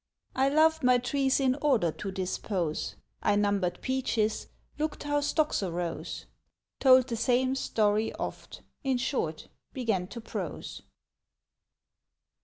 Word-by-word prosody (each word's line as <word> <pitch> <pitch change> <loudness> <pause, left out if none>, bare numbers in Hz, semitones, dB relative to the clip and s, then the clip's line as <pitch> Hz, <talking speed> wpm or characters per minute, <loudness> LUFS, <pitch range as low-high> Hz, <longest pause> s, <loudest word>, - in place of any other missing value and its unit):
I 265 +1 +3
loved 315 +2 +4
my 250 -1 +5
trees 265 +2 +1
in 265 -2 +3
order 245 - +3
to 195 - -6
dispose; 185 -3 -2 0.3
I - - +2
numbered 200 -3 +1
peaches, 230 -5 0 0.3
looked 310 0 -2
how 290 0 +1
stocks 300 -1 +1
arose; 175 -2 -4 0.5
Told 260 -2 +7
the 235 - -3
same 250 +3 +2
story 215 -4 +1
oft, - - -6 0.2
in 265 -2 +1
short, 240 - -2 0.3
began 220 -8 0
to 235 +4 -8
prose. 225 - -6
245 Hz, 120 wpm, -29 LUFS, 200-270 Hz, 0.5 s, Told